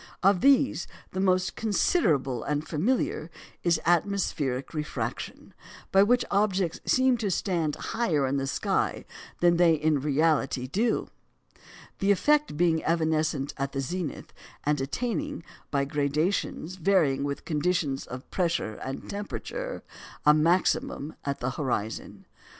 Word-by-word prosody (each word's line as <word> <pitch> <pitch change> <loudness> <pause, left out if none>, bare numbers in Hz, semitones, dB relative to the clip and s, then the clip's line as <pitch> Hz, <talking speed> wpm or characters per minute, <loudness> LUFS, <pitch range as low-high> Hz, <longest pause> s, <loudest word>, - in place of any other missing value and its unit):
Of 195 -1 +4
these, 270 - +4 0.2
the 185 - -4
most 185 -1 +2
considerable 170 - +1
and 150 +1 -2
familiar 170 - 0 0.3
is 170 -1 +2
atmospheric 165 -7 0
refraction, 150 -1 -5 0.4
by 195 - +6
which 240 +5 +3
objects 195 -4 +1
seem 260 -1 +4
to 210 -3 -1
stand 170 -4 0
higher 165 - 0
in 135 +1 0
the 135 0 -1
sky - - -1 0.4
than 175 -1 +5
they 170 -2 +5
in 155 -1 +1
reality 145 -2 +1
do, 215 - 0 0.9
the 195 - +1
effect 295 - +3
being 165 -1 +2
evanescent 155 -3 0
at 135 0 -3
the 135 - -2
zenith, 165 +2 -4 0.3
and 145 -1 +1
attaining, 170 - -3 0.3
by 140 -1 +1
gradations 150 +5 -1
varying 160 -7 +2
with 140 0 -4
conditions 155 -3 0
of 125 +1 -8
pressure 170 - -1
and 135 +1 -6
temperature, - - -5 0.4
a 150 - +8
maximum 160 -2 +1
at 140 -2 -3
the 130 +2 -1
horizon. 120 -6 -3
160 Hz, 125 wpm, -27 LUFS, 140-195 Hz, 0.9 s, a